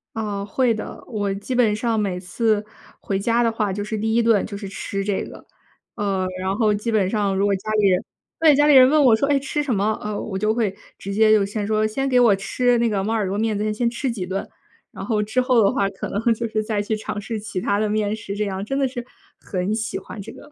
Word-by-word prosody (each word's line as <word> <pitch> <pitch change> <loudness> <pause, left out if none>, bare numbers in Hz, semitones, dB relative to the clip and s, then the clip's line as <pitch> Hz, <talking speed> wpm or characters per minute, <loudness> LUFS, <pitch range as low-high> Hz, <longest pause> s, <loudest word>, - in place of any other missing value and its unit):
啊， 205 -2 -3
会 235 +3 +1
的。 215 - -7
我 205 -3 -2
基 205 +6 -5
本 225 -4 +3
上 225 0 0
每 190 -3 -1
次 210 +3 0 0.3
回 195 -1 -2
家 235 +3 +2
的 230 - +2
话 210 -3 -1
就 205 +1 -3
是 215 +1 -4
第 220 +1 -1
1 235 - +4
顿 225 -3 +3
就 200 -2 -6
是 200 -1 -7
吃 195 0 -4
这 200 -1 -1
个。 - - -11 0.5
呃， 195 -2 -1 0.2
然 190 +1 -1
后 215 -2 +2
基 210 +3 -2
本 200 -4 +2
上 205 -3 0
如 195 +1 +2
果 200 - +2
家 215 +3 -5
里 200 - +4
人 180 - +2 0.4
对， 310 -3 +6
家 295 +1 +4
里 295 - +6
人 255 -1 +9
问 300 -1 +4
我 235 -4 +6
说： 280 +5 0
“哎， 280 -1 +3
吃 295 +2 -2
什 270 -5 -1
么？” 210 +2 0
呃 210 -1 -4
我 190 -3 -4
就 215 +2 +1
会 220 -5 -1 0.2
直 200 - -6
接 215 +1 +4
就 210 -2 +5
先 205 +1 -3
说： 215 0 +1
“先 270 +5 -2
给 250 -2 +3
我 230 -5 +5
吃 240 +5 +1
那 235 0 +2
个 200 -3 0
猫 215 - -2
耳 215 -3 0
朵 195 - -2
面， 215 0 0
咱 215 +1 -1
先 235 +2 0
吃 245 +2 -2
几 195 -6 -4
顿。 195 +1 -3 0.5
“然 - - -7
后 215 -3 0
之 220 +5 0
后 250 -3 +3
的 200 - +4
话 195 0 0
可 190 - -6
能 205 - -2
就 230 +1 -3
是 215 -1 -1
再 215 -1 -2
去 215 +1 -1
尝 210 -1 -5
试 220 +1 -4
其 205 -3 -4
它 200 +2 0
的 215 0 0
面 210 0 0
食 200 -2 -6
这 210 - -1
样， 195 0 -3
真 270 +6 -3
的 270 -1 +2
是， 245 -1 -6 0.4
很 185 +2 -2
喜 220 0 -2
欢 210 - -8
这 195 - -9
个。 - - -14
215 Hz, 285 characters per minute, -22 LUFS, 200-230 Hz, 0.5 s, 人